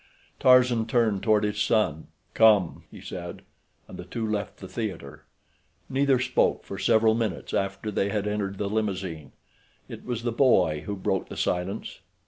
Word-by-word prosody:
Tarzan 125 Hz, -3 st, +4 dB
turned 115 Hz, -4 st, +1 dB
toward 110 Hz, -2 st, +3 dB
his 105 Hz, 0 st, -1 dB
son. 105 Hz, -8 st, +1 dB, 0.3 s
"Come!" 105 Hz, -6 st, +4 dB
he -, -, -12 dB
said, -, -, -7 dB, 0.4 s
and -, -, -11 dB
the -, -, -5 dB
two 115 Hz, -2 st, -4 dB
left 105 Hz, -2 st, -3 dB
the 95 Hz, -, -9 dB
theater. 95 Hz, -, -6 dB, 0.7 s
Neither 135 Hz, 0 st, +3 dB
spoke 125 Hz, -, +1 dB
for -, -, -7 dB
several 110 Hz, -1 st, +4 dB
minutes 110 Hz, -6 st, -3 dB
after 100 Hz, +2 st, -2 dB
they 100 Hz, 0 st, 0 dB
had 105 Hz, -1 st, -2 dB
entered 100 Hz, -2 st, -2 dB
the 100 Hz, -, -2 dB
limousine. 95 Hz, -8 st, -3 dB, 0.6 s
It -, -, -9 dB
was 120 Hz, -2 st, -4 dB
the 120 Hz, -, -1 dB
boy 95 Hz, -, +3 dB
who 100 Hz, -, -2 dB
broke 95 Hz, -1 st, -2 dB
the -, -, -8 dB
silence. 90 Hz, +4 st, -2 dB
105 Hz, 160 wpm, -26 LUFS, 95-115 Hz, 0.7 s, Tarzan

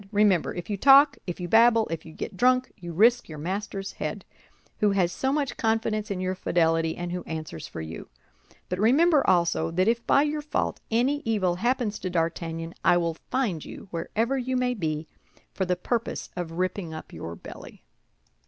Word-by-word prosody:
Remember, 205 Hz, -5 st, +3 dB
if 175 Hz, -1 st, -6 dB
you 205 Hz, -, -2 dB
talk, 275 Hz, +4 st, +6 dB
if 175 Hz, -, -4 dB
you 175 Hz, -, -4 dB
babble, 225 Hz, +2 st, +5 dB
if 165 Hz, 0 st, -5 dB
you -, -, -10 dB
get 190 Hz, -, -6 dB
drunk, 255 Hz, +5 st, +3 dB
you 175 Hz, -1 st, -8 dB
risk 230 Hz, +7 st, +3 dB
your 155 Hz, -, -7 dB
master's 195 Hz, +4 st, -4 dB
head, -, -, -5 dB, 0.5 s
who 210 Hz, -, +4 dB
has 180 Hz, -3 st, +2 dB
so 265 Hz, +7 st, -1 dB
much 280 Hz, -4 st, -1 dB
confidence 220 Hz, -1 st, 0 dB
in 195 Hz, -2 st, -2 dB
your 185 Hz, 0 st, -1 dB
fidelity, 165 Hz, -3 st, +1 dB
and 175 Hz, 0 st, -4 dB
who 180 Hz, 0 st, -3 dB
answers 155 Hz, -, -6 dB
for -, -, -7 dB
you. 80 Hz, +1 st, -8 dB, 0.6 s
But 180 Hz, -, -3 dB
remember, 290 Hz, -, +5 dB
also, 170 Hz, -3 st, +2 dB
that 185 Hz, +4 st, +1 dB
if 235 Hz, +1 st, +1 dB
by 280 Hz, -, +5 dB
your 300 Hz, 0 st, -1 dB
fault 295 Hz, -, -2 dB
any 255 Hz, +6 st, +1 dB
evil 190 Hz, -6 st, 0 dB
happens 240 Hz, -1 st, 0 dB
to 185 Hz, -, -3 dB
D'Artagnan, 165 Hz, -1 st, -2 dB
I 175 Hz, -, +5 dB
will 170 Hz, -1 st, 0 dB, 0.2 s
find 215 Hz, -, -1 dB
you, 195 Hz, -, -10 dB
wherever 225 Hz, +10 st, -1 dB
you 255 Hz, +1 st, -1 dB
may 250 Hz, 0 st, +1 dB
be, 155 Hz, -7 st, -3 dB, 0.5 s
for 190 Hz, -, -1 dB
the 180 Hz, 0 st, +1 dB
purpose 235 Hz, +4 st, -3 dB
of 175 Hz, -2 st, -4 dB
ripping 180 Hz, -1 st, -2 dB
up 155 Hz, -, -9 dB
your 85 Hz, -, -6 dB
belly." -, -, -12 dB
195 Hz, 190 wpm, -26 LUFS, 170-240 Hz, 0.6 s, talk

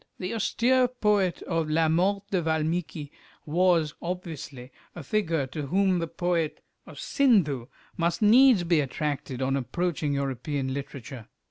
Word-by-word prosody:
The 185 Hz, +2 st, -4 dB
austere 250 Hz, +3 st, +2 dB
poet 210 Hz, -7 st, 0 dB
of 165 Hz, -3 st, -1 dB
"La 160 Hz, +1 st, +2 dB
Mort 190 Hz, +5 st, +1 dB
de 185 Hz, -3 st, +1 dB
Valmiki" 160 Hz, -1 st, -2 dB, 0.3 s
was, 165 Hz, -1 st, +2 dB
obviously, 155 Hz, -7 st, -6 dB, 0.2 s
a 175 Hz, -, -7 dB
figure 165 Hz, -4 st, 0 dB
to 140 Hz, +2 st, -6 dB
whom 190 Hz, +2 st, +2 dB
the 165 Hz, -, -2 dB
poet 170 Hz, -1 st, -2 dB, 0.2 s
of -, -, -11 dB
"Sindhu" 180 Hz, -, +2 dB, 0.3 s
must 170 Hz, 0 st, 0 dB
needs 230 Hz, -1 st, +6 dB
be 170 Hz, -2 st, +2 dB
attracted 140 Hz, -2 st, -3 dB
on 135 Hz, +1 st, 0 dB
approaching 150 Hz, +2 st, -2 dB
European 135 Hz, 0 st, -2 dB
literature. 135 Hz, -4 st, -7 dB
165 Hz, 135 wpm, -27 LUFS, 145-185 Hz, 0.3 s, needs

